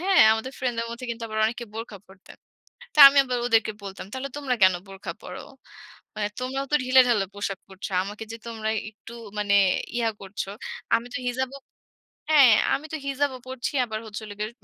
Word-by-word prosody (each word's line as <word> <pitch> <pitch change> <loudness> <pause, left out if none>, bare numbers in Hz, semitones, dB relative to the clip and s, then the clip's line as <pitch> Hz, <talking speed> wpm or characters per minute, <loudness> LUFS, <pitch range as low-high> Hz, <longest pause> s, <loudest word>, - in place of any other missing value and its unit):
হ্যাঁ, 380 +1 +4
আমাদের 225 +4 -3
ফ্রেন্ডসদের 230 -2 -2
মধ্যে 240 +2 -7
কিন্তু 230 0 -6
আবার 215 0 -4
অনেকে 240 +2 -4
বোরখা 225 -2 -7
পড়তেন। 190 0 -16 0.6
তো - - -5
আমি 275 - -3
আবার 250 -2 -1
ওদেরকে 225 -2 +3
বলতাম 195 -1 -8
তাহলে 265 +1 -4
তোমরা 280 -3 -1
কেন 185 -1 +7
বোরখা 195 0 -7
পরো? - - -8 0.7
মানে 210 -1 -1
তোমরাও 265 +2 -2
তো - - +6
ঢিলে-ঢালা 250 -5 +4
পোশাক 200 -1 -3
পড়ছ। 190 0 -7 0.2
আমাকে 205 +3 -7
যে - - -5
তোমরা 220 -2 -3 0.2
একটু 215 +1 -14 0.3
মানে 205 -1 +1 0.4
ইয়া 230 -2 +1
করছ। 195 +1 -5 0.5
আমি 230 +1 -5
তো - - -1
হিজাবও 260 +2 -3 0.7
হ্যাঁ, 280 -6 +8 0.2
আমি 300 - -4
তো - - -1
হিজাবও 275 -1 -1
পড়ছি 260 -1 -4
আবার 220 -2 -4
হচ্ছে 215 +1 -7
হলো 210 -1 -8
গিয়ে 215 +1 -2
230 Hz, 180 wpm, -25 LUFS, 210-260 Hz, 0.7 s, হ্যাঁ